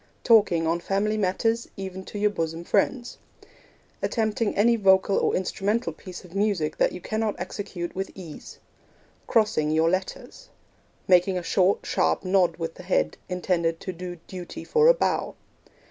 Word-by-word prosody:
Talking 205 Hz, -8 st, +4 dB
on 165 Hz, +1 st, +1 dB
family 200 Hz, +4 st, 0 dB
matters, 220 Hz, +4 st, 0 dB
even 190 Hz, -1 st, -6 dB
to -, -, -7 dB
your 210 Hz, 0 st, +2 dB
bosom 165 Hz, -3 st, -3 dB
friends. 240 Hz, +7 st, 0 dB, 0.8 s
Attempting 220 Hz, -1 st, 0 dB
any 235 Hz, +4 st, +4 dB
vocal 195 Hz, -2 st, +4 dB
or -, -, +1 dB
instrumental 195 Hz, 0 st, -1 dB
piece 180 Hz, +3 st, -10 dB
of 175 Hz, -, -15 dB
music 195 Hz, -7 st, 0 dB
that -, -, +2 dB
you 180 Hz, -, -7 dB
cannot 215 Hz, +2 st, -2 dB
execute 180 Hz, -1 st, -5 dB
with 190 Hz, +1 st, -3 dB
ease. 170 Hz, -5 st, -10 dB, 0.7 s
Crossing 215 Hz, -10 st, +2 dB
your 160 Hz, +2 st, +3 dB
letters. 190 Hz, -, -4 dB, 0.6 s
Making 185 Hz, +1 st, +4 dB
a 180 Hz, -, -3 dB
short, 185 Hz, +3 st, +2 dB
sharp 80 Hz, -, 0 dB
nod 185 Hz, -3 st, +2 dB
with 165 Hz, -1 st, -4 dB
the -, -, -12 dB
head, 180 Hz, +1 st, 0 dB
intended 175 Hz, -2 st, 0 dB
to 185 Hz, -, -5 dB
do 180 Hz, +1 st, -7 dB
duty 180 Hz, -2 st, -8 dB
for 460 Hz, 0 st, +3 dB
a -, -, +8 dB
bow. -, -, -1 dB
190 Hz, 155 wpm, -25 LUFS, 175-210 Hz, 0.8 s, a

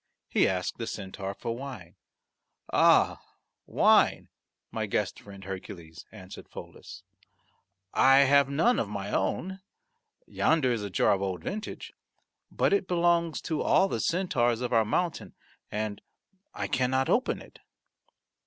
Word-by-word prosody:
He -, -, +3 dB
asked 90 Hz, +2 st, -2 dB
the 115 Hz, -, -4 dB
centaur 95 Hz, 0 st, -6 dB
for 115 Hz, -, -4 dB
wine. 120 Hz, -10 st, -9 dB, 0.8 s
"Ah, -, -, +4 dB, 0.5 s
wine, -, -, +3 dB, 0.4 s
my -, -, -3 dB
guest -, -, -2 dB
friend 100 Hz, -1 st, -12 dB
Hercules," 90 Hz, -4 st, -9 dB
answered 95 Hz, -4 st, -11 dB
Pholus, -, -, -11 dB, 0.9 s
"I 135 Hz, +1 st, +6 dB
have 140 Hz, 0 st, +4 dB
none 165 Hz, -, +2 dB
of 105 Hz, -, -2 dB
my 100 Hz, -1 st, -5 dB
own. 190 Hz, +2 st, -2 dB, 0.7 s
Yonder 155 Hz, -6 st, +1 dB
is 115 Hz, -3 st, -1 dB
a 100 Hz, -, -4 dB
jar 95 Hz, -, +2 dB
of 100 Hz, -, -2 dB
old 95 Hz, -4 st, -3 dB
vintage, 210 Hz, -, -6 dB, 0.6 s
but -, -, +1 dB
it 200 Hz, -2 st, +1 dB
belongs 170 Hz, -2 st, +1 dB
to 155 Hz, -2 st, -2 dB
all 190 Hz, -, +3 dB
the -, -, -3 dB
centaurs 125 Hz, -10 st, 0 dB
of 125 Hz, 0 st, -2 dB
our 115 Hz, -1 st, +4 dB
mountain 175 Hz, +10 st, -2 dB, 0.4 s
and 105 Hz, -1 st, -3 dB, 0.5 s
I -, -, -4 dB
cannot 130 Hz, +1 st, +1 dB
open 255 Hz, -, +1 dB
it." -, -, -15 dB
120 Hz, 135 wpm, -28 LUFS, 100-160 Hz, 0.9 s, I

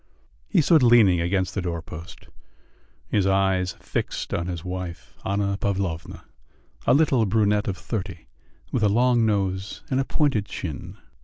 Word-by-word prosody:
He 185 Hz, -, +3 dB
stood 155 Hz, +1 st, +5 dB
leaning 115 Hz, -8 st, +5 dB
against 90 Hz, +1 st, 0 dB
the 100 Hz, -, -2 dB
doorpost, 85 Hz, -1 st, -7 dB, 0.8 s
his 100 Hz, -3 st, +2 dB
eyes 95 Hz, -1 st, +2 dB
fixed -, -, -4 dB
on 85 Hz, -, -1 dB
his 85 Hz, -1 st, -5 dB
wife, 90 Hz, 0 st, -6 dB
Anna 100 Hz, 0 st, 0 dB
Pavlovna, 95 Hz, -5 st, -3 dB, 0.6 s
a -, -, +6 dB
little 135 Hz, -7 st, +3 dB
brunette 105 Hz, 0 st, +2 dB
of 95 Hz, -3 st, -2 dB
thirty, 95 Hz, -7 st, -5 dB, 0.5 s
with 120 Hz, -, 0 dB
a 105 Hz, -, +4 dB
long 120 Hz, +1 st, +3 dB
nose 95 Hz, -2 st, -1 dB
and 130 Hz, -, +2 dB
a -, -, +2 dB
pointed 135 Hz, -8 st, 0 dB
chin. 80 Hz, -6 st, -6 dB
100 Hz, 145 wpm, -24 LUFS, 90-110 Hz, 0.8 s, a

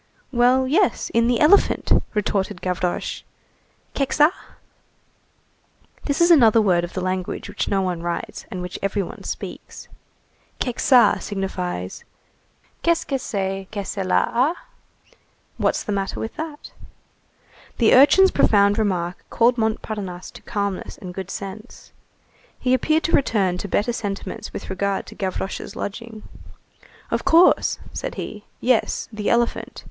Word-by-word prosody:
"Well, 255 Hz, +1 st, +3 dB
yes, 350 Hz, +8 st, +1 dB
in 230 Hz, 0 st, +3 dB
the 245 Hz, -1 st, +2 dB
elephant!" 325 Hz, +7 st, +4 dB, 0.2 s
retorted 205 Hz, -2 st, -1 dB
Gavroche. 180 Hz, -1 st, -2 dB, 0.7 s
"Kekçaa?" 295 Hz, +3 st, +3 dB, 1.7 s
This 285 Hz, 0 st, -1 dB
is 340 Hz, 0 st, +5 dB
another 230 Hz, -8 st, +6 dB
word 180 Hz, -5 st, +3 dB
of 175 Hz, -, -6 dB
the 185 Hz, -, -3 dB
language 185 Hz, +1 st, -3 dB
which 205 Hz, 0 st, -3 dB
no 195 Hz, -1 st, +1 dB
one 180 Hz, -2 st, -2 dB
writes, 170 Hz, 0 st, -5 dB
and 180 Hz, -1 st, -5 dB
which 180 Hz, -, -6 dB
every 195 Hz, 0 st, 0 dB
one -, -, -9 dB
speaks. -, -, -7 dB, 0.7 s
Kekçaa 250 Hz, 0 st, +4 dB
signifies: 180 Hz, -, -4 dB, 0.8 s
_Qu'est 335 Hz, -1 st, +2 dB
que 270 Hz, -2 st, -1 dB
c'est 195 Hz, -4 st, -3 dB
que 205 Hz, -2 st, -4 dB
cela 190 Hz, -2 st, +1 dB, 0.3 s
a? -, -, -25 dB
_ -, -, -25 dB, 0.4 s
[What's -, -, 0 dB
the -, -, -4 dB
matter 195 Hz, -1 st, -2 dB
with 225 Hz, -, -5 dB
that?] 310 Hz, -2 st, -7 dB, 1.1 s
The 230 Hz, -, +4 dB
urchin's 370 Hz, +9 st, +7 dB
profound 200 Hz, 0 st, +4 dB
remark 180 Hz, -4 st, -1 dB
recalled 240 Hz, +1 st, +3 dB
Montparnasse 210 Hz, -4 st, -3 dB
to -, -, -13 dB
calmness 200 Hz, -2 st, -3 dB
and 180 Hz, -2 st, -8 dB
good 190 Hz, 0 st, -6 dB
sense. 200 Hz, +2 st, -8 dB, 0.7 s
He 255 Hz, 0 st, +1 dB
appeared 310 Hz, +5 st, +2 dB
to 330 Hz, -, -1 dB
return 195 Hz, -, +2 dB
to 200 Hz, -, -4 dB
better 210 Hz, +5 st, 0 dB
sentiments 200 Hz, -4 st, -5 dB
with -, -, -7 dB
regard 195 Hz, +1 st, -1 dB
to -, -, -12 dB
Gavroche's 190 Hz, 0 st, -4 dB
lodging. 220 Hz, +1 st, -6 dB, 0.9 s
"Of -, -, 0 dB
course," 335 Hz, +3 st, +4 dB, 0.2 s
said -, -, -4 dB
he, 210 Hz, -1 st, -7 dB
"yes, 250 Hz, -2 st, +1 dB
the 210 Hz, -1 st, -2 dB
elephant. 235 Hz, 0 st, 0 dB
205 Hz, 135 wpm, -22 LUFS, 190-250 Hz, 1.7 s, urchin's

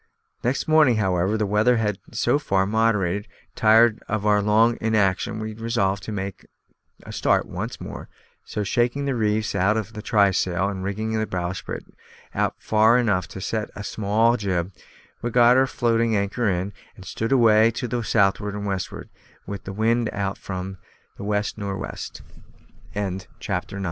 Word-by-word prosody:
Next 125 Hz, +3 st, 0 dB
morning, 155 Hz, -6 st, +5 dB
however, 95 Hz, 0 st, +1 dB
the 105 Hz, -, 0 dB
weather 105 Hz, +4 st, +3 dB
had 105 Hz, -3 st, -1 dB
so 120 Hz, +5 st, +1 dB
far 95 Hz, -9 st, +1 dB
moderated 105 Hz, -2 st, +1 dB
that, 100 Hz, -, -30 dB
tired 110 Hz, +1 st, +5 dB
of 105 Hz, -1 st, -2 dB
our 105 Hz, -1 st, +4 dB
long 110 Hz, +3 st, +3 dB
inaction, 110 Hz, -2 st, +1 dB
we 110 Hz, 0 st, -4 dB
resolved 105 Hz, -3 st, -1 dB
to -, -, -5 dB
make 100 Hz, -2 st, -5 dB, 0.6 s
a -, -, -9 dB
start -, -, +2 dB
once -, -, -5 dB
more, -, -, -8 dB, 0.3 s
so 105 Hz, -, -3 dB
shaking 120 Hz, +7 st, 0 dB
the 140 Hz, -, 0 dB
reefs 110 Hz, -2 st, 0 dB
out 100 Hz, +3 st, +2 dB
of 110 Hz, 0 st, -4 dB
the 105 Hz, -, -6 dB
trysail, 95 Hz, -3 st, +2 dB
and 95 Hz, -2 st, -5 dB
rigging 110 Hz, +3 st, -2 dB
our 110 Hz, 0 st, 0 dB
bowsprit 90 Hz, 0 st, -4 dB, 0.5 s
out -, -, 0 dB
far 110 Hz, +2 st, +4 dB
enough 100 Hz, -7 st, +1 dB
to 95 Hz, -, -9 dB
set 110 Hz, +3 st, -2 dB
a 105 Hz, -, -6 dB
small 110 Hz, +4 st, +2 dB
jib, 95 Hz, -3 st, -2 dB, 0.5 s
we 120 Hz, -, -1 dB
got 120 Hz, +1 st, +5 dB
our 130 Hz, +1 st, +4 dB
floating 115 Hz, -2 st, +1 dB
anchor 100 Hz, +3 st, 0 dB
in, 95 Hz, +2 st, -2 dB, 0.2 s
and 95 Hz, -, -13 dB
stood 115 Hz, +6 st, -3 dB
away 115 Hz, -3 st, +5 dB
to 120 Hz, +2 st, -4 dB
the 120 Hz, +1 st, -2 dB
southward 105 Hz, -1 st, +1 dB
and 105 Hz, 0 st, -4 dB
westward, 95 Hz, -2 st, -4 dB, 0.4 s
with 100 Hz, -1 st, -7 dB
the 95 Hz, -, -5 dB
wind 115 Hz, +2 st, +1 dB
out 100 Hz, -1 st, -2 dB
from 95 Hz, 0 st, -6 dB, 0.4 s
about -, -, -7 dB
west 105 Hz, +1 st, -1 dB
nor' 100 Hz, -1 st, -3 dB
west. -, -, -7 dB, 0.7 s
CHAPTER -, -, -21 dB
TEN. 95 Hz, -2 st, -2 dB
CHASED 95 Hz, -, -15 dB
BY -, -, -1 dB
PIRATES. -, -, -8 dB
105 Hz, 180 wpm, -23 LUFS, 100-115 Hz, 0.7 s, morning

